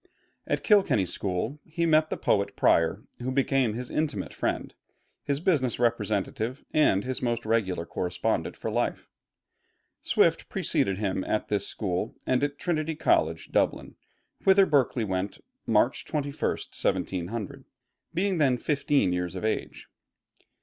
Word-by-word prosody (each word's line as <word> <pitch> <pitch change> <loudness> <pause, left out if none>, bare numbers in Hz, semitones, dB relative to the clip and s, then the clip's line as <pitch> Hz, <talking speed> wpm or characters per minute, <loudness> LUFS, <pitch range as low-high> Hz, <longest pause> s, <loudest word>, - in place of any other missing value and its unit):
At - - -1
Kilkenny 195 - +4
School 100 - -3
he 170 +1 -2
met 155 -1 +4
the - - -2
poet 100 -1 +1
Prior, 85 +6 +3 0.2
who 125 +2 -3
became 135 -4 +1
his 125 +1 -6
intimate 155 -2 -2
friend, - - -2 0.5
his 140 0 -1
business 150 -8 +1
representative, 110 +2 -1
and 145 -11 +3
his 130 0 -3
most 120 -2 -1
regular 100 -7 0
correspondent 90 +1 -2
for - - -4
life. - - -1 0.9
Swift - - +2
preceded 95 -1 0
him 95 -2 -1
at 110 - -1
this 100 -1 +1
school 95 +1 -2
and 130 +1 +1
at 145 0 -1
Trinity 160 -2 -1
College, 80 - +1
Dublin, - - 0 0.5
whither 195 0 +6
Berkeley 135 -7 +2
went 95 -1 -2 0.3
March 115 +3 +2
21, 145 -2 -3
1700, 95 +4 -2 0.5
being 185 +1 0
then 135 -4 +3
fifteen 140 - +1
years 90 0 -2
of 95 - -4
age. 110 - -3
120 Hz, 135 wpm, -27 LUFS, 100-145 Hz, 0.9 s, whither